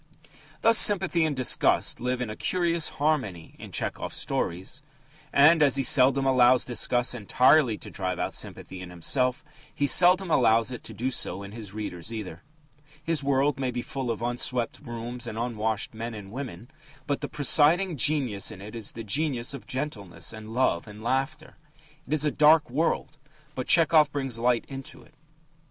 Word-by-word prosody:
'" - - -25
Thus 230 0 +6
sympathy 185 -5 +4
and 150 -2 -2
disgust 130 -1 +2
live 125 +1 -2
in 120 -3 -3
a - - -7
curious 170 0 0
harmony 130 - -2
in - - -10
Tchehov's - - -4
stories. 95 - -4 0.5
And, 155 +3 +5
as 140 -3 +4
he 135 - +1
seldom 135 +1 +5
allows 125 -1 +4
disgust 120 +1 0
entirely 125 +2 +3
to - - -10
drive 90 -2 -3
out - - -3
sympathy 95 0 -6
in 90 - -9
himself, 125 - -1 0.3
he 145 - -1
seldom 180 +5 +4
allows 115 -3 +3
it 125 - -8
to - - -7
do 130 +3 -2
so 100 -5 -2
in 100 - -9
his 105 -2 -10
readers 105 -2 -6
either. 100 -6 -7 0.6
His 160 -2 -1
world 140 +1 +1
may 130 -2 -1
be 120 -1 -4
full 135 -3 -5
of 115 0 -3
unswept 120 0 -2
rooms 120 -1 -6
and 110 - -6
unwashed 110 -2 -2
men 115 +1 -6
and 100 -2 -10
women, 120 - -8 0.3
but 145 - -2
the - - -4
presiding 160 +5 +3
genius 125 -6 +1
in - - -8
it 105 +3 -10
is 115 -3 -6
the 115 - -7
genius 130 +2 -1
of 140 - -9
gentleness 105 - -5
and 110 0 -10
love 115 -6 0
and 105 +1 -11
laughter. 135 +5 -3 0.5
It - - -3
is 155 -1 +2
a 150 - +1
dark 150 -2 +4
world, 150 +1 -2 0.3
but 130 -2 -5
Tchehov 155 -3 +4
brings 135 -5 -4
light 120 0 +1
into 135 -1 -10
it. - - -23
125 Hz, 175 wpm, -26 LUFS, 110-145 Hz, 0.6 s, Thus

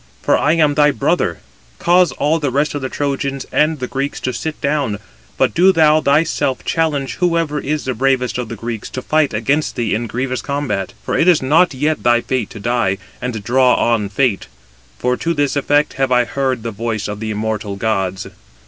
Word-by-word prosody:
for - - +3
I - - +2
am 155 -3 +3
thy 150 0 +4
brother. 140 - 0 0.4
Cause 175 -2 +3
all 150 +4 +1
the 145 -3 -1
rest 145 +3 0
of 145 - -3
the 130 - -3
Trojans 140 -1 -2
and 155 +1 +2
the 130 - -3
Greeks 135 +2 -3
to 130 - -2
sit 150 +7 -4
down, 140 -7 -1 0.4
but - - +2
do 185 +3 +5
thou 155 -3 +4
thyself 145 -2 +1
challenge 150 -5 -1
whoever 165 -4 0
is 150 +2 -3
the 130 - -1
bravest 125 0 0
of 120 -3 -4
the 115 - -5
Greeks 115 0 -5
to 130 - -6
fight 155 -2 +2
against 135 +8 0
thee 115 -3 -1
in 115 +2 -1
grievous 130 +3 -3
combat. 140 -10 -3
For - - -2
it 165 - +2
is 175 -6 +4
not 155 +3 +3
yet 150 +3 0
thy 120 0 +3
fate 125 -5 -2
to - - -10
die, 115 -3 0 0.2
and 120 -4 -4
draw 125 +3 +3
on 115 -4 +1
fate; 110 -1 0 0.5
for 125 - 0
to 170 0 -1
this 145 -1 0
effect 145 +1 +2
have 135 -1 +1
I 125 -1 +4
heard 130 -3 -2
the 115 - -3
voice 110 0 -3
of 105 0 -5
the 110 0 -4
immortal 105 -1 -3
gods." 95 -2 -1
135 Hz, 200 wpm, -18 LUFS, 115-150 Hz, 0.5 s, do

